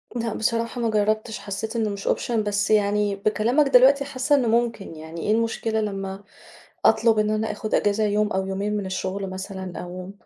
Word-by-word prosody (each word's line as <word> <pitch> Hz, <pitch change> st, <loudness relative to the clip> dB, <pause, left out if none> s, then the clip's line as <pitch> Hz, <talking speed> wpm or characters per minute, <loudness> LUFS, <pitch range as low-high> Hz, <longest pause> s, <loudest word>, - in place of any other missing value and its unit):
لأ 230 Hz, -2 st, -2 dB
بصراحة 230 Hz, +2 st, -1 dB
ما 230 Hz, -, +1 dB
جربتش 215 Hz, +1 st, 0 dB
حسيت 205 Hz, +3 st, -5 dB
إنه 225 Hz, -2 st, 0 dB
مش 200 Hz, -1 st, -6 dB
option -, -, 0 dB
بس 205 Hz, -3 st, 0 dB
يعني 205 Hz, -1 st, +2 dB
بكلامك 215 Hz, +8 st, +2 dB
دلوقتي، 275 Hz, +2 st, +5 dB
حاسة 275 Hz, +1 st, +1 dB
إنه 260 Hz, -4 st, +1 dB
ممكن 230 Hz, -6 st, 0 dB
يعني 160 Hz, +1 st, -8 dB
إيه 210 Hz, -, 0 dB
المشكلة 225 Hz, 0 st, 0 dB
لمّا 195 Hz, -1 st, -4 dB, 0.6 s
أطلب 220 Hz, 0 st, +4 dB
إن 210 Hz, 0 st, +1 dB
أنا 215 Hz, 0 st, 0 dB
آخد 215 Hz, +1 st, -2 dB
إجازة 205 Hz, +1 st, +1 dB
يوم 210 Hz, 0 st, +1 dB
أو 190 Hz, 0 st, 0 dB
يومين 200 Hz, +2 st, -2 dB
من 200 Hz, -, -3 dB
الشغل 190 Hz, +1 st, -3 dB
مثلًا، 190 Hz, -1 st, -6 dB
أو 180 Hz, +1 st, -7 dB
210 Hz, 180 wpm, -24 LUFS, 195-230 Hz, 0.6 s, دلوقتي